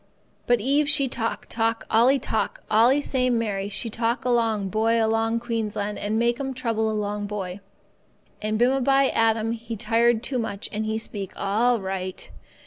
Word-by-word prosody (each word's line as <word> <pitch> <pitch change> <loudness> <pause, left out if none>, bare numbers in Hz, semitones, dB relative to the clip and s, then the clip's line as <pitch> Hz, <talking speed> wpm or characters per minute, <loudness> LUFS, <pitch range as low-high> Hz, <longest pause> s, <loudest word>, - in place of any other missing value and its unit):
But 245 -1 +4
Eve 280 +6 +1
she 295 -3 +4
talk, 230 -2 -3
talk, 225 0 -1
talk, - - -29
allee 245 +5 +5
time—allee 235 +2 +1
same 255 -3 +1
Mary 200 -3 -2
she 210 - -3
talk 230 +2 -1
along 225 -5 +1
boy 220 +3 +1
along 225 +1 +1
Queensland 215 -3 -3
and 210 +2 -1
make 235 +2 +1
'm 270 -1 -3
trouble 225 -3 -1
along 210 -1 -2
boy. 195 -2 -5 0.8
And 215 0 -1
bimeby 270 +2 +3
Adam 225 0 +2
he 230 0 -5
tired 230 +2 +2
too 255 +1 -2
much, 205 -3 -4
and 215 +1 -2
he 220 0 -1
speak, 205 -4 -5
'All 230 +5 +1
right. 190 -1 -5
225 Hz, 160 wpm, -24 LUFS, 210-240 Hz, 0.8 s, allee